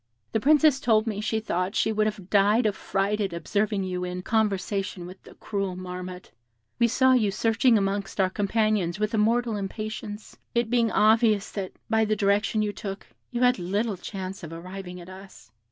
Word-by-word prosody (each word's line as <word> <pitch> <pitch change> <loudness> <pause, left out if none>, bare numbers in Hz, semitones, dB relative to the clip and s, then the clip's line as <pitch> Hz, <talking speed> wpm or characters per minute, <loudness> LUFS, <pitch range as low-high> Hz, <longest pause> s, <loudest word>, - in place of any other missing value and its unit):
"The 220 - +1
Princess 300 +2 +4
told 220 -4 +3
me 210 -2 -3
she 220 +1 0
thought 185 -1 -2
she 220 - +2
should 215 0 +2
have 200 -3 -6
died 210 +4 +4
of 210 -2 +1
fright 200 +3 -1
at 195 -4 -1
observing 200 +4 -1
you 180 -1 -3
in 180 0 -4
conversation 195 -4 -1
with 185 +2 -11
the - - -15
cruel 195 -3 -3
Marmotte; 180 0 -7 0.5
we 235 - +5
saw 260 +2 +4
you 225 -5 +3
searching 225 +3 +3
amongst 200 0 -2
our 185 -1 +3
companions 205 -3 0
with 215 +2 -1
a 220 - +2
mortal 230 +1 +2
impatience, 210 +1 -6 0.2
it 235 -1 +1
being 235 -2 +3
obvious 215 -1 +3
that, 195 -3 -5
by 220 0 +2
the 215 0 +1
direction 205 +2 +1
you 205 -1 -2
took, 195 -2 -6 0.2
you 240 0 -3
had 250 -3 +4
little 200 +5 -1
chance 190 +1 -6
of 165 -3 -8
arriving 180 +2 -8
at 175 - -11
us. 185 -11 -13
205 Hz, 185 wpm, -26 LUFS, 190-220 Hz, 0.5 s, we